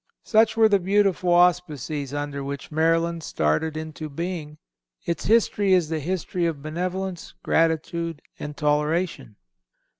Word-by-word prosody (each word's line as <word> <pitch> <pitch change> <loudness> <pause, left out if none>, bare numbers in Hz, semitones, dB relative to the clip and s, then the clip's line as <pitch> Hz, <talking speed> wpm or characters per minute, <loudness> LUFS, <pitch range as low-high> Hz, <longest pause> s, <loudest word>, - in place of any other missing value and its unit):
Such 225 0 +3
were 225 -1 +7
the 200 -2 +3
beautiful 190 -1 +2
auspices 160 -5 +2
under 145 -1 -4
which 140 +2 -6
Maryland 165 +2 +1
started 155 - 0
into 155 0 -6
being.... 155 -1 -5 0.5
Its 170 - -2
history 205 -3 +3
is 175 -4 +3
the 160 -1 -1
history 175 +2 -2
of 150 -4 -4
benevolence, 180 +3 -4
gratitude 165 0 0 0.2
and 150 -1 -6
toleration." 150 - 0
165 Hz, 125 wpm, -24 LUFS, 150-180 Hz, 0.5 s, were